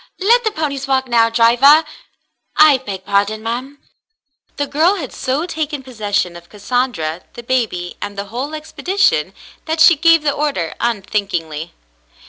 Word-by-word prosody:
Let 465 +5 +3
the 440 - +1
ponies 285 -8 -4
walk 265 -1 +1
now, 230 -1 +3
driver. 245 +7 +5 0.7
I 300 -3 +6
beg 195 -7 -7
pardon, 200 +2 0
ma'm." 250 +5 -4 0.8
The 285 - 0
girl 320 +7 +2
had 295 -10 -6
so 270 +6 -2
taken 310 -5 -4
possession 205 -8 -2
of 170 0 -13
Cassandra, 205 -7 -2
the 240 - -10
baby, 220 -8 -2
and 205 0 -6
the 200 - -4
whole 275 +6 -4
expedition, 360 +5 0 0.3
that 320 0 -2
she 335 +1 +7
gave 330 +1 +4
the 290 - +2
order 280 - -2
unthinkingly. 190 -8 -3
255 Hz, 145 wpm, -17 LUFS, 205-300 Hz, 0.8 s, she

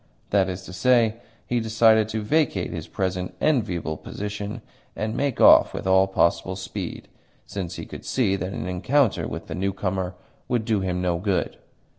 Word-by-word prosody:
That 95 -2 +3
is 95 0 -5
to 95 - -10
say, 115 +2 +3 0.3
he 120 - 0
decided 110 -1 +4
to 110 -1 -3
vacate 130 - +1
his 80 -3 -6
present 90 -1 -3
enviable 90 - 0
position 105 +3 -6 0.3
and 110 +1 -3
make 140 -3 -1
off - - +7
with - - -5
all 95 0 +4
possible 95 0 +1
speed, 95 0 -6 0.4
since 90 -3 -5
he - - -6
could - - -9
see 110 -7 +1
that 95 0 -4
an - - -4
encounter 115 +8 +1
with - - -6
the - - -6
newcomer 95 -1 -2 0.3
would 120 -3 0
do 110 -3 +1
him 90 -1 -2
no 85 -2 0
good. 95 0 -1
95 Hz, 170 wpm, -24 LUFS, 90-110 Hz, 0.4 s, off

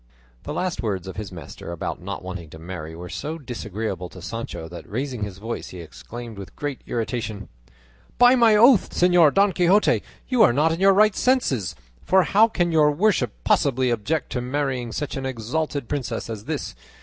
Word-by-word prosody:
The - - -4
last 180 -1 -2
words 95 -5 -2
of 95 - -7
his 105 -2 -5
master 85 0 -9
about 85 - -4
not 100 +1 -6
wanting 90 -3 -7
to 80 - -11
marry 80 -1 -7
were 90 +2 -8
so 155 - -5
disagreeable 105 - -5
to 90 - -12
Sancho 90 -3 -6
that 85 +1 -10
raising 125 +1 -3
his 100 -2 -4
voice 115 +4 -5
he 90 - -9
exclaimed 115 +6 -9
with 100 - -10
great 145 -3 -4
irritation: 110 -4 -3 0.7
"By 245 +1 +7
my 230 -3 +5
oath, 235 0 +6
Señor 175 -4 +5
Don 200 +3 +4
Quixote, 185 +4 +3 0.3
you 250 -3 +2
are 185 - +6
not 150 +5 +3
in 165 - -2
your 195 +1 +6
right 210 0 +5
senses; 135 - +1 0.3
for 190 0 +4
how 210 +5 +5
can 175 -6 0
your 155 -2 +5
worship 190 - +1
possibly 130 -2 +2
object 130 +6 -1
to 125 - -2
marrying 130 -2 -2
such 145 +5 -4
an 135 0 -3
exalted 130 +3 -3
princess 125 -5 -3
as 110 -1 -7
this? - - -4
125 Hz, 185 wpm, -23 LUFS, 100-170 Hz, 0.7 s, By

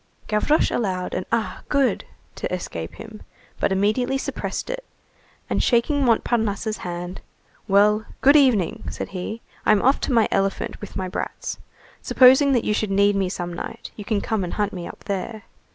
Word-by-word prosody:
Gavroche 215 +9 +2
allowed 185 -5 -1
an: 185 - -3
"Ah! 230 -2 -1
good!" 280 -3 +1 0.3
to - - -5
escape 85 - -5
him, 220 -1 -10 0.4
but - - +1
immediately 215 +7 +1
suppressed 280 - -4
it, - - -5 0.6
and - - 0
shaking 275 +4 +2
Montparnasse's 225 -3 +1
hand:— 175 0 -6 0.5
"Well, 210 +2 +4 0.2
good 280 +2 +6
evening," 250 - +3
said - - -5
he, 195 +5 -5 0.2
"I'm 215 - +5
going 200 - +1
off 270 - +4
to - - -2
my 230 -3 +4
elephant 195 0 -1
with 205 - -9
my 185 - -2
brats. 185 - -5 0.4
Supposing 265 +2 +6
that 240 - +2
you 210 - +1
should 215 0 -1
need 200 +1 +3
me 195 -2 +1
some 175 -1 -4
night, - - -7
you 210 - -7
can 205 -1 0
come 220 -4 -1
and 175 - -4
hunt 210 0 -1
me 175 -2 -5
up - - -11
there. 205 +2 -4
210 Hz, 175 wpm, -23 LUFS, 195-240 Hz, 0.6 s, good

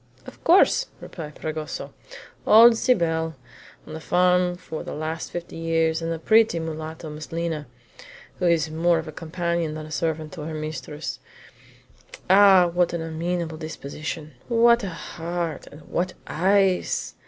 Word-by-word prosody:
"Of - - -13
course," 385 +8 +5
replied 150 -4 -9
Fragoso 155 -1 -5 0.5
"old 230 +2 +8
Cybele, 165 -9 +1 0.5
on - - -10
the 160 - -5
farm 180 +1 +2
for 160 -3 -7
the - - -6
last 155 +2 -4
fifty 175 0 -6
years, 165 0 +1
and 165 0 -2
a 165 - -2
pretty 220 +3 +4
mulatto, 160 0 -5
Miss 150 +1 -9
Lina, 165 -3 -3 0.7
who 180 - +1
is 165 -2 +2
more 170 +2 +2
of 160 0 -4
a - - -6
companion 170 0 -2
than 155 0 -6
a 155 - -11
servant 160 -1 -2
to 170 - -7
her 155 +1 -5
mistress. 155 0 -5 1.1
Ah, 195 -2 +7
what 175 -1 +2
an 170 -1 -2
amiable 165 0 -3
disposition! 155 0 -6
What 235 0 +4
a 195 - -2
heart, 170 -2 -5
and 145 - -13
what 180 +1 -2
eyes! 190 +2 +1
165 Hz, 150 wpm, -24 LUFS, 155-180 Hz, 1.1 s, old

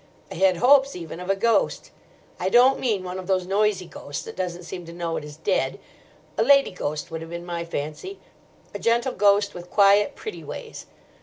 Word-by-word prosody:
I - - -4
had 185 0 +3
hopes 275 +6 +5
even 165 -1 -7
of 180 +1 -7
a 195 - +3
ghost. 230 +3 +1 0.5
I 185 - 0
don't 250 +5 +5
mean 215 -7 0
one 185 0 -5
of 185 - -8
those 185 -2 +1
noisy 200 0 +1
ghosts 145 -3 -7
that - - -8
doesn't 180 -1 -4
seem 180 +1 -7
to - - -8
know 170 -1 -3
it - - -4
is 150 0 -10
dead. 135 -4 0 0.6
A - - +5
lady 275 +3 +5
ghost 150 -2 -4
would 160 0 -5
have 165 - -8
been 170 +1 -6
my 170 -1 -4
fancy, 170 - -5 0.6
a - - -5
gentle 235 +2 +1
ghost 200 0 +3
with 175 0 -10
quiet, 200 0 +4
pretty 435 - -7
ways. 460 -2 -8
185 Hz, 205 wpm, -24 LUFS, 170-220 Hz, 0.6 s, hopes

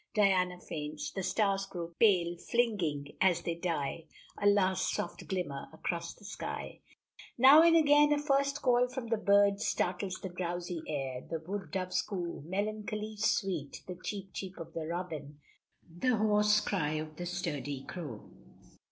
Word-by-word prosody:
Diana 185 -4 +3
faints! 150 -2 -5
the 195 - -3
stars 195 +1 +1
grow 170 -2 -6
pale, 180 -6 +4
flinging, 175 -10 -1
as 175 -3 +4
they 170 - -1
die, 165 -2 -2 0.3
a 205 - +1
last 190 -2 +3
soft - - -4
glimmer 170 -8 -3
across 170 +1 -4
the 205 - -17
sky. 205 - -6 0.6
Now 270 +5 +9
and 335 0 +6
again 295 -2 +6
a 295 - +4
first 280 -1 +1
call 250 -1 +4
from 250 -2 -6
the 225 - +2
birds 200 -1 +4
startles 185 +1 -1
the 190 - -6
drowsy 175 -1 -4
air. 135 -4 -3
The 165 - -2
wood 185 +1 -5
dove's 185 +2 -1
coo, 180 -7 -4
melancholy 215 +2 -3
sweet 190 -8 -1
the 180 - -5
cheep 195 -2 -5
cheep 190 -1 -6
of 165 -1 -8
the 160 -2 -4
robin 160 -4 -5 0.5
the 180 +9 0
hoarse 210 0 +4
cry 160 -7 -1
of 155 0 -5
the 175 - -4
sturdy 145 -6 -3
crow. 145 - -7
185 Hz, 155 wpm, -32 LUFS, 165-210 Hz, 0.6 s, Now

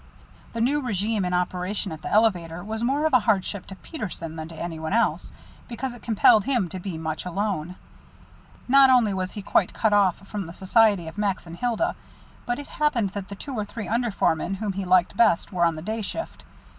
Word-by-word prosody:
The 230 - -2
new 285 +5 +2
régime 210 -4 -1
in - - -2
operation 180 +2 -2
at 155 -1 -7
the - - -5
elevator 180 -6 +1
was 220 +2 -4
more 280 +5 +1
of 315 - +1
a 255 - +7
hardship 200 -3 0
to 195 - -8
Peterson 180 - -6
than 160 -1 -6
to 165 - -11
any 165 0 -5
one 160 +3 -3
else, 230 +1 +1 0.4
because 245 +1 -4
it 245 - -12
compelled 215 -2 +4
him 240 -10 +1
to 185 - -6
be 180 -2 -5
much 160 -1 -4
alone. 180 -2 -2 0.9
Not 270 +1 +7
only 240 -5 +4
was 185 -1 -3
he 205 - -6
quite 190 - +2
cut 220 -2 +2
off 195 -4 +4
from 200 -4 -4
the 165 - -9
society 200 -2 +3
of 160 +6 -8
Max 200 -4 -1
and 165 0 -9
Hilda, 245 - 0 0.5
but 240 0 0
it 290 - -8
happened 245 -10 0
that 200 -1 -6
the 200 - -6
two 275 +7 -7
or 215 -4 -1
three 210 +1 -7
under 235 +2 0
foremen 185 -2 0
whom 200 0 -3
he 195 0 -4
liked 180 +1 +3
best 200 -4 +3
were 175 -1 +3
on 165 -1 +1
the 155 - -7
day 220 +3 -3
shift. 215 - -6
200 Hz, 220 wpm, -25 LUFS, 180-230 Hz, 0.9 s, a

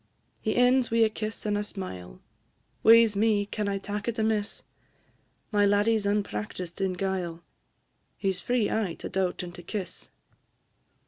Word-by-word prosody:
He 215 - -1
ends 250 0 +4
wi' 230 0 +4
a - - +1
kiss 215 0 -5
and 210 -1 +1
a 205 - 0
smile 95 - -8 0.6
Wae 230 +1 +8
's 210 -2 -3
me! 210 -1 +2
can 210 0 -3
I 200 - -1
tak' 205 +2 -5
it 235 0 -2
amiss? 215 -2 -1 0.9
My 205 -1 +3
laddie 205 +3 +4
's 205 -2 -1
unpractised 180 - -3
in 190 -1 +1
guile, 180 -3 -3 0.7
He 195 - 0
's 180 - -8
free 245 -4 +1
aye 205 -6 -1
to - - -7
daut 185 -1 -1
and 175 -1 -7
to 175 - -9
kiss! 185 +2 -6
205 Hz, 170 wpm, -27 LUFS, 185-220 Hz, 0.9 s, Wae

